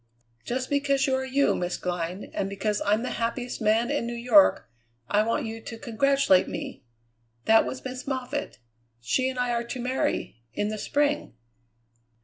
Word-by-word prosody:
"Just 255 Hz, +1 st, -2 dB
because 280 Hz, -1 st, +2 dB
you 265 Hz, -, +1 dB
are 260 Hz, 0 st, +1 dB
you, 270 Hz, +2 st, +2 dB
Miss 175 Hz, 0 st, -2 dB
Glynn, 180 Hz, +1 st, -4 dB
and 195 Hz, -, -1 dB
because 205 Hz, +1 st, -1 dB
I'm 210 Hz, +3 st, +3 dB
the 255 Hz, -, -3 dB
happiest 245 Hz, +1 st, -2 dB
man 225 Hz, +4 st, +2 dB
in 285 Hz, -5 st, -1 dB
New 240 Hz, -, -4 dB
York, 250 Hz, +5 st, +5 dB, 0.4 s
I 205 Hz, -, +3 dB
want 230 Hz, +2 st, 0 dB
you 225 Hz, 0 st, -6 dB
to 230 Hz, -, -8 dB
congratulate 235 Hz, -3 st, +3 dB
me. -, -, -6 dB, 0.6 s
That 225 Hz, 0 st, +6 dB
was 260 Hz, -, -6 dB
Miss 255 Hz, +1 st, -6 dB
Moffatt. 270 Hz, +2 st, -3 dB, 0.4 s
She 255 Hz, -, +1 dB
and 260 Hz, -, -6 dB
I 250 Hz, -1 st, 0 dB
are 235 Hz, 0 st, 0 dB
to 250 Hz, -, -5 dB
marry 250 Hz, -, -1 dB
in 205 Hz, +8 st, -1 dB
the 215 Hz, 0 st, -4 dB
spring." 290 Hz, -, 0 dB
240 Hz, 170 wpm, -26 LUFS, 215-265 Hz, 0.6 s, That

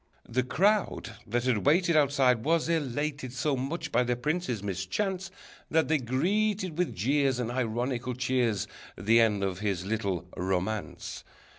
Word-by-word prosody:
_] -, -, -12 dB
The 130 Hz, -, +3 dB
crowd 180 Hz, -, +1 dB
that 120 Hz, +3 st, 0 dB
had 125 Hz, -2 st, +1 dB
waited 170 Hz, +2 st, +4 dB
Outside 135 Hz, -5 st, +3 dB
was 165 Hz, +2 st, +2 dB
elated 145 Hz, -4 st, -1 dB
So 145 Hz, +1 st, 0 dB
much 150 Hz, +5 st, -3 dB
by 120 Hz, -, +3 dB
the 125 Hz, 0 st, +1 dB
prince's 150 Hz, -, -2 dB
mischance, 175 Hz, -, -2 dB, 0.4 s
That 160 Hz, 0 st, +2 dB
they 155 Hz, -1 st, +3 dB
greeted 185 Hz, -, 0 dB
with 180 Hz, +1 st, -1 dB
jeers 135 Hz, +6 st, +2 dB
And 120 Hz, -1 st, -2 dB
ironical 125 Hz, +1 st, -1 dB
cheers, 125 Hz, -5 st, +1 dB, 0.3 s
The 115 Hz, +3 st, +4 dB
end 105 Hz, -3 st, +2 dB
of 95 Hz, -1 st, -2 dB
his 100 Hz, -4 st, -1 dB
little 100 Hz, -4 st, -2 dB
romance. 95 Hz, +4 st, -3 dB
130 Hz, 150 wpm, -29 LUFS, 110-155 Hz, 0.4 s, waited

